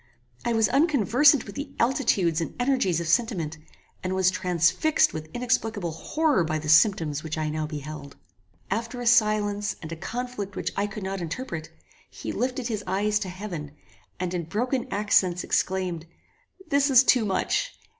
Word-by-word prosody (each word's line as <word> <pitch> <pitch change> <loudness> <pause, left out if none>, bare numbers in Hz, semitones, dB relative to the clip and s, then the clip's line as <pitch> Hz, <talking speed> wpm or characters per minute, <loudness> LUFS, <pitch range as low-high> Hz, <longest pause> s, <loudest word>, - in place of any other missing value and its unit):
I 235 - 0
was 225 -2 +3
unconversant 280 - +4
with 200 - -9
the 285 0 -7
altitudes 195 - +2
and 165 - -4
energies 245 - +1
of 170 - -4
sentiment, 165 -5 0 0.4
and 185 0 -1
was 185 -1 +3
transfixed 180 - +2
with 155 0 -6
inexplicable 225 -6 -1
horror 295 - +1
by 155 -1 -1
the 155 0 -5
symptoms 155 -3 +4
which 160 0 -5
I 155 -1 -1
now 155 0 -2
beheld. 150 -1 -7 0.6
After 235 +2 -2
a 245 - -4
silence 210 -3 +2
and 160 -1 -8
a - - -3
conflict 225 +1 -5
which - - -2
I 200 +1 0
could 205 0 -7
not 190 0 -3
interpret, 170 -2 -5 0.4
he - - -6
lifted 255 0 -2
his 215 -4 -3
eyes 205 +3 +1
to 195 -3 -4
heaven, 180 -6 -6 0.5
and 180 0 -2
in 175 -2 -2
broken 245 - -1
accents 185 -3 +2
exclaimed, 180 -3 -1 0.6
"This 280 -1 +3
is 260 -1 +7
too 250 -2 +4
much! 210 - -1
200 Hz, 165 wpm, -26 LUFS, 170-245 Hz, 0.6 s, is